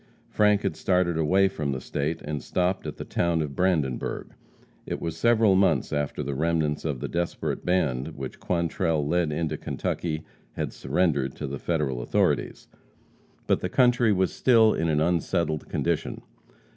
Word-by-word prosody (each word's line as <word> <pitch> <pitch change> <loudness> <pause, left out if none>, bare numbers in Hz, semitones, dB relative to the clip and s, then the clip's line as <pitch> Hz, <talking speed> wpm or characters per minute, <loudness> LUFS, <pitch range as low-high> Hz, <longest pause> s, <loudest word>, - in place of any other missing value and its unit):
Frank 105 -1 +3
had 95 -5 -1
started 90 -2 +1
away 90 +5 +3
from 75 -7 -3
the 65 - -3
State 75 +5 -3
and 75 -2 -4
stopped 90 +4 -1
at 75 - -6
the - - -6
town 85 -1 0
of 70 -2 -6
Brandenburg. 80 -9 -1 0.5
It - - -3
was 80 -1 -4
several 115 -3 +4
months 95 -4 +2
after 75 -1 -2
the 70 - -3
remnants 80 0 0
of 70 -6 -2
the - - -2
desperate 85 0 -2
band 80 -5 0
which 65 -1 -6
Quantrell 85 -3 0
led 85 -1 +1
into 80 +1 -2
Kentucky 80 -2 -3 0.3
had - - -3
surrendered 70 -7 0
to 75 - -5
the 70 0 -5
Federal 75 -7 -1
authorities. - - 0 0.8
But - - +2
the - - -3
country 120 -3 +4
was 95 -2 +1
still 115 -4 +5
in 80 - 0
an 75 -1 +2
unsettled 80 -2 0
condition. - - -2
80 Hz, 160 wpm, -26 LUFS, 75-95 Hz, 0.8 s, still